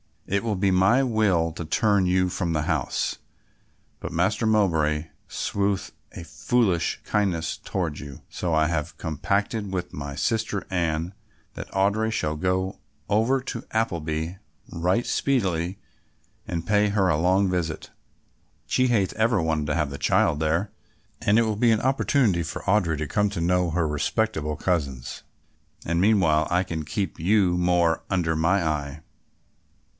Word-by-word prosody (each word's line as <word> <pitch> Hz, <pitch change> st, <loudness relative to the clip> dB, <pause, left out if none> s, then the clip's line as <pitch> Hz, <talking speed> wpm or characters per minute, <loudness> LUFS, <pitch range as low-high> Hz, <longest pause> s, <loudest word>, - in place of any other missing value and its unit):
It 100 Hz, +2 st, -1 dB
would 105 Hz, -5 st, -1 dB
be 100 Hz, -1 st, +3 dB
my 95 Hz, +9 st, +4 dB
will 105 Hz, -9 st, +2 dB
to 80 Hz, +1 st, -6 dB
turn 100 Hz, +3 st, +2 dB
you 90 Hz, 0 st, +2 dB
from 90 Hz, -1 st, -2 dB
the 75 Hz, -1 st, 0 dB
house, 80 Hz, -5 st, -1 dB, 0.8 s
but 80 Hz, -, -6 dB
Master 100 Hz, +6 st, +1 dB
Mowbray 80 Hz, -7 st, +1 dB, 0.2 s
sheweth 100 Hz, -1 st, -1 dB, 0.2 s
a 85 Hz, -, -7 dB
foolish 85 Hz, +3 st, 0 dB
kindness 95 Hz, -6 st, 0 dB
toward 85 Hz, -6 st, -3 dB
you, 70 Hz, -3 st, -9 dB
so 85 Hz, -2 st, -2 dB
I 80 Hz, 0 st, +3 dB
have 80 Hz, -1 st, -3 dB
compacted 100 Hz, -, -2 dB
with 90 Hz, -2 st, -4 dB
my 70 Hz, -1 st, -6 dB
sister 105 Hz, +4 st, -1 dB
Anne 85 Hz, 0 st, -1 dB, 0.4 s
that -, -, -8 dB
Audry 105 Hz, +3 st, +1 dB
shall 75 Hz, -8 st, -1 dB
go 95 Hz, +3 st, -1 dB, 0.3 s
over 115 Hz, +6 st, +2 dB
to 125 Hz, -3 st, -6 dB
Appleby 85 Hz, -5 st, -2 dB, 0.3 s
right 90 Hz, +8 st, 0 dB
speedily 95 Hz, -9 st, 0 dB, 0.7 s
and 85 Hz, -1 st, -3 dB
pay 105 Hz, +1 st, +3 dB
her 100 Hz, -2 st, +2 dB
a 80 Hz, -, +2 dB
long 95 Hz, +4 st, +2 dB
visit. 85 Hz, -3 st, -3 dB, 0.7 s
She 130 Hz, -, +2 dB
hath 105 Hz, -6 st, +1 dB
ever 110 Hz, -3 st, +2 dB
wanted 80 Hz, -2 st, -1 dB
to 75 Hz, -, 0 dB
have 75 Hz, -4 st, 0 dB
the 70 Hz, -, -5 dB
child 75 Hz, -, +2 dB
there 80 Hz, +6 st, 0 dB, 0.5 s
and 105 Hz, +2 st, +3 dB
it 115 Hz, -, +5 dB
will 110 Hz, -2 st, -1 dB
be 115 Hz, +1 st, +4 dB
an 110 Hz, -, +2 dB
opportunity 130 Hz, -7 st, +2 dB
for 80 Hz, -, -5 dB
Audry 95 Hz, -5 st, +2 dB
to 80 Hz, -, -2 dB
come 105 Hz, +7 st, +1 dB
to 85 Hz, -, -3 dB
know 90 Hz, +1 st, +2 dB
her 85 Hz, 0 st, 0 dB
respectable 75 Hz, +1 st, -1 dB
cousins, 70 Hz, -8 st, -2 dB, 0.6 s
and 85 Hz, +1 st, 0 dB
meanwhile 95 Hz, -7 st, +3 dB
I 90 Hz, +1 st, +2 dB
can 80 Hz, -4 st, -5 dB
keep 85 Hz, +2 st, -3 dB
you 95 Hz, +1 st, +3 dB
more 90 Hz, -2 st, +2 dB
under 85 Hz, -4 st, 0 dB
my 85 Hz, +4 st, +2 dB
eye." 75 Hz, -1 st, -3 dB
90 Hz, 155 wpm, -25 LUFS, 80-105 Hz, 0.8 s, it